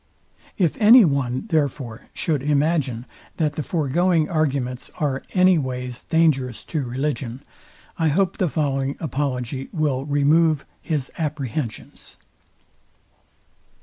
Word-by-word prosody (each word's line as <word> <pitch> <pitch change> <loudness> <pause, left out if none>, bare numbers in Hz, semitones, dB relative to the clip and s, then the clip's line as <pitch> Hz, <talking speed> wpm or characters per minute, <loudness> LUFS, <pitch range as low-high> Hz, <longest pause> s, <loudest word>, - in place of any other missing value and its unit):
If 175 -6 +1
any 225 +1 +8
one, 135 -1 -1
therefore, 140 - -1
should 150 -5 -1
imagine 145 -4 0 0.3
that 155 -3 +1
the 155 - -3
foregoing 165 +2 +1
arguments 135 -6 -1
are 140 -3 -1
any 185 -2 +5
ways 125 -2 -4
dangerous 140 -7 +1
to 155 - +1
religion, 130 0 -3 0.6
I 160 - +2
hope 180 +4 +1
the 180 - +1
following 140 -3 -1
apology 135 -3 -3
will 145 -6 -1
remove 150 +1 +3 0.2
his 150 -5 -2
apprehensions. 145 -6 -5
145 Hz, 110 wpm, -22 LUFS, 130-160 Hz, 0.6 s, any